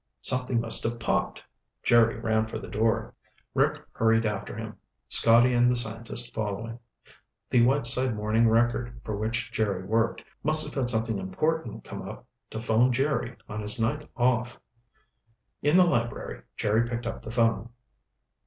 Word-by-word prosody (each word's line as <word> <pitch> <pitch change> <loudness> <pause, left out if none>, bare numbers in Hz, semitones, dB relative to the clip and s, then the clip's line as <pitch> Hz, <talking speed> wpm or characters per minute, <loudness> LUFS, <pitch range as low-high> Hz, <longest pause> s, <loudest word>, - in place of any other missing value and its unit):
"Something 125 -1 +1
must 115 -1 +4
have 115 +1 -2
popped!" - - -1 0.4
Jerry 115 -1 +4
ran 110 -1 0
for - - -5
the - - -8
door. 110 +1 0 0.4
Rick - - +1
hurried 115 0 +2
after 105 -2 -3
him, - - -7 0.3
Scotty 120 +2 +6
and 120 0 +4
the - - +1
scientist 115 +1 -1
following. 110 +2 -4 0.7
The 120 -2 +5
Whiteside 130 -1 +2
Morning 110 +2 +2
Record, 120 +1 0
for 110 - -4
which 110 +2 -3
Jerry 100 -4 -1
worked, 115 +4 0 0.2
must 155 +1 +3
have 150 - -7
had 130 -3 -1
something 110 -3 -1
important 110 - -2
come - - -8
up - - -9 0.2
to 110 - -6
phone 115 +2 +2
Jerry 125 -2 -1
on 110 - -6
his 105 +3 -1
night 145 +7 -1
off. 120 -1 0 1.0
In 150 +5 +3
the 185 - +7
library, 115 - -2 0.2
Jerry 110 +2 +2
picked 120 0 -4
up 115 - -5
the - - -9
phone. 115 -1 +1
115 Hz, 155 wpm, -27 LUFS, 110-120 Hz, 1.0 s, the